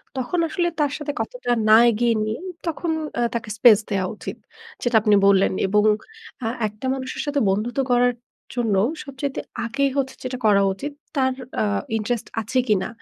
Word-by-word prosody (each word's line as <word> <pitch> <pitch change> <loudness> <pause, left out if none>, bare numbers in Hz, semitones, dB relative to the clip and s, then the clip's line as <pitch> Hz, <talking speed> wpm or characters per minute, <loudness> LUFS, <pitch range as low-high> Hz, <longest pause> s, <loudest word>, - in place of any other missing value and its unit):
তখন 265 +7 -1
আসলে 345 +1 0
তার 290 -2 +2
সাথে 295 -1 -3
কথাটা 245 +2 -4 0.2
না 215 - +9
এগিয়ে 235 +1 +2
নিয়ে 215 +1 -3 0.3
তখন 330 +1 -2 0.3
আ - - +2
তাকে 230 -2 -3
স্পেস 225 -3 +8
দেওয়া 195 -2 0
উচিত। - - -7 0.4
যেটা 240 -2 0
আপনি 210 -1 +4
বললেন। 195 -1 +5 0.2
এবং 210 +2 +3 0.6
আ - - +1 0.2
একটা 210 +4 -9
মানুষের 260 -1 -4
সাথে 290 -1 0
বন্ধুত্ব 230 +7 -1
করার 245 0 +4 0.4
জন্য 225 -4 +1 0.3
সবচাইতে 275 -1 -4 0.3
আগেই 275 +4 +1
হচ্ছে 265 -1 -1
যেটা 255 0 -4
করা 200 -2 +5
উচিত 285 +9 -6 0.2
তার 260 -1 +2 0.3
আ - - +3 0.3
ইন্টারেস্ট 225 +1 -2
আছে 225 +4 0
কিনা, 195 -3 +2
245 Hz, 165 wpm, -23 LUFS, 215-270 Hz, 0.6 s, না